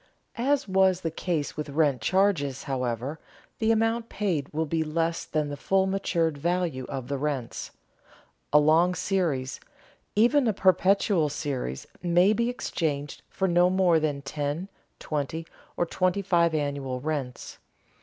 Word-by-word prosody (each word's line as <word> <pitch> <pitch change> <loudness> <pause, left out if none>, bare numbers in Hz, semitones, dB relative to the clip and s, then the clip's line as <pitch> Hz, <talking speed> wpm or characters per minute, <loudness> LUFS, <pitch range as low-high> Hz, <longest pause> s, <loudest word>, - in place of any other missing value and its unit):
As 275 +2 +1
was 190 -1 +3
the 165 - -2
case 160 -2 -2
with 150 -1 -4
rent 140 -4 +1
charges, 145 - +1
however, 130 +2 -3 0.4
the 225 -1 +3
amount 225 +1 +1
paid 170 -9 -2
will 160 +2 -1
be 160 +1 -1
less 165 +2 -1
than 150 -2 -1
the 145 - -4
full 190 +6 +1
matured 170 -5 0
value 170 -5 -1
of 135 -3 -5
the 140 0 -2
rents. 140 -5 -3 0.8
A 150 - +6
long 165 +4 +4
series, 155 -11 -1 0.6
even 245 +5 +4
a 220 - +2
perpetual 185 -3 +3
series, 135 - -4 0.2
may 180 +3 +4
be 235 +2 0
exchanged 150 - -3
for 190 - -1
no 175 0 +4
more 180 -3 +3
than 145 -3 -2
ten, 145 +6 -3 0.3
twenty, 155 +2 -3 0.3
or 175 - +2
twenty 185 +3 0
five 170 -3 +2
annual 140 -3 -2
rents. 140 -3 -4
160 Hz, 145 wpm, -27 LUFS, 145-190 Hz, 0.8 s, A